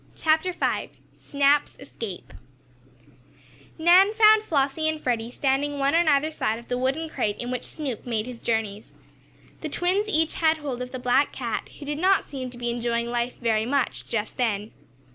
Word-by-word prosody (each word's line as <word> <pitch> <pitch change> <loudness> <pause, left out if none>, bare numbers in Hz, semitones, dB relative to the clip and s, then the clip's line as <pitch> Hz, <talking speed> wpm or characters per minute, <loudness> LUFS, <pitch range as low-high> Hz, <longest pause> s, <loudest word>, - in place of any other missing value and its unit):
CHAPTER 320 +3 +2
V 360 - -1 0.2
SNAP'S 285 +1 +1
ESCAPE 225 -8 -8 1.4
Nan 360 +5 +6
found 435 -1 +7
Flossie 310 -3 0
and 315 0 -3
Freddie, 235 -4 -1
standing 280 +2 0
one 275 0 +1
on 335 0 +3
either 300 +1 +3
side 220 -7 -1
of 235 - -13
the 245 - 0
wooden 275 +6 -1
crate 230 -9 -2
in 245 0 -4
which 250 -1 -3
Snoop 275 -8 -5
made 220 -3 -1
his 245 -2 -8
journeys. 220 -2 -2 0.7
The 315 - -5
twins 375 +7 0
each 320 -5 +1
had 320 -1 +2
hold 275 -5 -5
of 250 - -4
the 255 - -4
black 250 +3 +2
cat, 235 -4 -4
who 290 - -9
did 295 +1 -3
not 380 +2 +3
seem 260 -3 -6
to 245 - -13
be 240 0 -2
enjoying 235 0 -1
life 240 +1 -1
very 225 -2 +1
much 275 0 -1
just 220 -2 -3
then. 215 -3 -1
270 Hz, 180 wpm, -25 LUFS, 235-315 Hz, 1.4 s, found